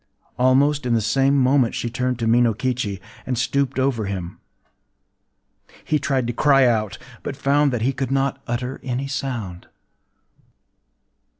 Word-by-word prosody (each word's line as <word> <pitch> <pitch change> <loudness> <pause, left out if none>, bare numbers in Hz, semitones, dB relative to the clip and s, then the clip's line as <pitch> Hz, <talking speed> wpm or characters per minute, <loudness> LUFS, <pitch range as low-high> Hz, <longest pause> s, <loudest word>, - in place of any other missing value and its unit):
Almost 135 +2 +3
in 120 - +2
the - - +3
same 135 +6 +2
moment 130 -2 +3
she - - -2
turned 125 +1 -2
to 115 -2 -2
Minokichi, 115 -2 +1 0.3
and 125 -2 -1
stooped 130 +3 0
over 130 -5 0
him. 95 -3 -5 1.5
He 150 - +1
tried 135 -2 0
to 120 - -2
cry 135 +1 +4
out, 110 -4 0 0.2
but 140 - -5
found 140 +1 +2
that 120 -3 -2
he 135 +3 +1
could 135 0 -3
not 135 0 0
utter 125 +2 -3
any 130 0 -3
sound. 120 -10 -5
125 Hz, 140 wpm, -22 LUFS, 115-135 Hz, 1.5 s, cry